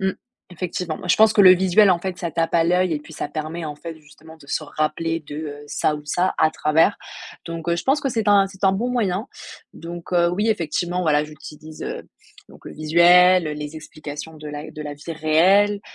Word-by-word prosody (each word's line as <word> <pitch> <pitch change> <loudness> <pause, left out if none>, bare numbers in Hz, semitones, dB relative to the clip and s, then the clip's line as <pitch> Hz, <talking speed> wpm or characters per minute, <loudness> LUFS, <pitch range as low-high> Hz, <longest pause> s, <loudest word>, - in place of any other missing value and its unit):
Mmh. 190 0 0 0.4
Effectivement, 175 -2 -4
bah - - -9
je - - +4
pense 220 0 +5
que 205 - +6
le 185 - +9
visuel, 190 +2 +5
en 180 - +3
fait, 185 +1 -5
ça 175 -1 -4
tape 165 +1 -1
à 165 -1 +4
l'œil 180 0 +1
et 150 - -4
puis 150 - -14
ça 145 - -5
permet 155 +2 -5
en 150 - -6
fait, 165 +1 -9
justement, 160 +2 -17
de 145 - -17
se 155 - -3
rappeler 155 +2 -2
de, 145 -1 -11
heu, 150 -2 -6
ça 150 +1 0
ou 150 - -6
ça 180 +4 0
à 155 - +4
travers. 160 +5 +2 0.5
Donc 165 0 -6
heu, 170 - +1
je - - -4
pense 275 +3 +2
que 275 - -1
c'est 225 -4 -1
un 200 -1 +5
c'est 195 0 -7
un 190 - +5
bon 220 +6 -1
moyen. 215 -4 -1 0.5
Donc 170 0 -9
heu, 170 -1 +3
oui, 205 +5 -1
effectivement, 175 -2 -1
voilà, 150 -3 +2
j'utilise, 155 +1 -11
heu, - - -5 0.5
donc - - -18
le - - -9
visuel, 175 +3 +5
heu, 150 - -3
les 150 +1 -7
explications 155 0 -9
de 150 0 -8
la 150 +1 -7
de 155 - -10
la 145 -1 -6
vie 150 +3 -8
réelle. 185 +7 +3
165 Hz, 230 wpm, -21 LUFS, 155-185 Hz, 0.5 s, le